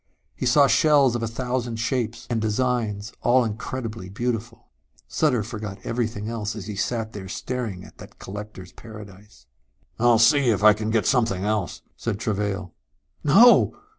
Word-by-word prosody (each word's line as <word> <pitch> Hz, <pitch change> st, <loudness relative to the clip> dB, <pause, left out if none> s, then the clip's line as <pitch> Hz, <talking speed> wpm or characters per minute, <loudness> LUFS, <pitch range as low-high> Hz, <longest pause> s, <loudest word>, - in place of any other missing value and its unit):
He 130 Hz, -, -2 dB
saw 140 Hz, +3 st, +5 dB
shells 140 Hz, 0 st, +4 dB
of 120 Hz, -, -2 dB
a 115 Hz, -, -1 dB
thousand 125 Hz, 0 st, -3 dB
shapes 115 Hz, 0 st, -2 dB
and 115 Hz, -2 st, -1 dB
designs, 110 Hz, -2 st, -1 dB
all 125 Hz, 0 st, +3 dB
incredibly 115 Hz, -2 st, -5 dB
beautiful.... 115 Hz, +2 st, -4 dB, 0.4 s
Sutter 130 Hz, -8 st, +1 dB
forgot 105 Hz, -3 st, -6 dB
everything 110 Hz, -3 st, -3 dB
else 110 Hz, -2 st, -4 dB
as 105 Hz, -4 st, -7 dB
he 105 Hz, -1 st, -6 dB
sat 110 Hz, +2 st, -2 dB
there 95 Hz, -2 st, -8 dB
staring 110 Hz, -4 st, -4 dB
at -, -, -17 dB
that -, -, -13 dB
collector's 100 Hz, -2 st, -9 dB
paradise. 105 Hz, -, -13 dB, 0.5 s
"I'll 120 Hz, 0 st, +5 dB
see 130 Hz, +3 st, +4 dB
if 105 Hz, -2 st, +1 dB
I 110 Hz, 0 st, +8 dB
can 105 Hz, +1 st, -4 dB
get 110 Hz, -1 st, +1 dB
something 110 Hz, -7 st, +1 dB
else," 105 Hz, -3 st, -2 dB
said 115 Hz, -4 st, -3 dB
Travail. 100 Hz, -4 st, -3 dB, 0.5 s
"No!" 220 Hz, -, +6 dB
115 Hz, 155 wpm, -24 LUFS, 105-125 Hz, 0.5 s, I